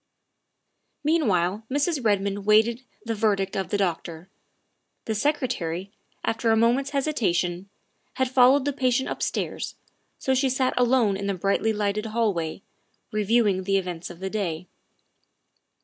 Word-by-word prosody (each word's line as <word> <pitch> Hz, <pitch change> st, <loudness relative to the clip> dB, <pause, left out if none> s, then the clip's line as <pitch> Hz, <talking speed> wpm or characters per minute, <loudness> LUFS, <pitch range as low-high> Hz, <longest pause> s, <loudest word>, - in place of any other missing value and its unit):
Meanwhile 210 Hz, -, +1 dB
Mrs. 285 Hz, +1 st, 0 dB
Redmond 200 Hz, -2 st, 0 dB
waited 220 Hz, +3 st, +4 dB, 0.2 s
the 230 Hz, -, -1 dB
verdict 205 Hz, -3 st, 0 dB
of 190 Hz, -1 st, -2 dB
the 205 Hz, -, 0 dB
doctor. 170 Hz, -2 st, -3 dB, 0.8 s
The 220 Hz, -, -1 dB
Secretary, 205 Hz, -, -1 dB, 0.3 s
after 225 Hz, +1 st, 0 dB
a 225 Hz, -, +5 dB
moment's 245 Hz, +5 st, +2 dB
hesitation, 200 Hz, -, -1 dB, 0.5 s
had 260 Hz, -, +1 dB
followed 260 Hz, +2 st, +5 dB
the 285 Hz, -, 0 dB
patient 260 Hz, -1 st, +1 dB
upstairs, -, -, -3 dB, 0.4 s
so 265 Hz, -, 0 dB
she 265 Hz, +1 st, +2 dB
sat 260 Hz, 0 st, +1 dB
alone 240 Hz, -5 st, +3 dB
in 200 Hz, 0 st, -4 dB
the 200 Hz, -, 0 dB
brightly 200 Hz, +4 st, +1 dB
lighted 210 Hz, 0 st, -1 dB
hall, 220 Hz, -1 st, +1 dB, 0.8 s
reviewing 210 Hz, -2 st, +2 dB
the 195 Hz, 0 st, +2 dB
events 180 Hz, -3 st, -4 dB
of 175 Hz, 0 st, -11 dB
the 190 Hz, -, -2 dB
day. 180 Hz, -5 st, -2 dB
215 Hz, 135 wpm, -25 LUFS, 195-255 Hz, 0.8 s, a